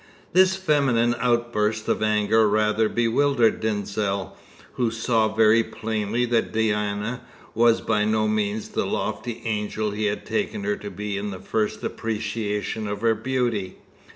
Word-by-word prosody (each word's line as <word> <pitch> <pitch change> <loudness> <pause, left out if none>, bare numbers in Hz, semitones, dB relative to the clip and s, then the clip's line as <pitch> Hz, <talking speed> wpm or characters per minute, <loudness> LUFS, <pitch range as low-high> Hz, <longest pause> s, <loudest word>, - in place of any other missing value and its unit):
This 185 +1 +5
feminine 140 -10 +2
outburst 115 -3 0
of - - 0
anger 110 0 +3
rather 110 +1 +2
bewildered 120 +1 +2
Denzil, 100 -3 -2 0.4
who 120 -2 0
saw 115 -1 +1
very 110 +1 +5
plainly 110 +1 -2
that 120 -1 0
Diana 105 +1 -1 0.3
was 115 0 +4
by 105 -2 +1
no 110 0 +1
means 105 0 -1
the - - -1
lofty 120 -1 -3
angel 105 -1 -2
he 105 +1 -2
had 105 0 -2
taken 205 0 -2
her 205 0 0
to 150 - -8
be 100 +1 -4
in 105 +1 -4
the 95 - -6
first 110 +1 -2
appreciation 105 -1 -3
of 100 0 -4
her 115 -1 +3
beauty. 110 -4 -2
110 Hz, 145 wpm, -24 LUFS, 105-115 Hz, 0.4 s, This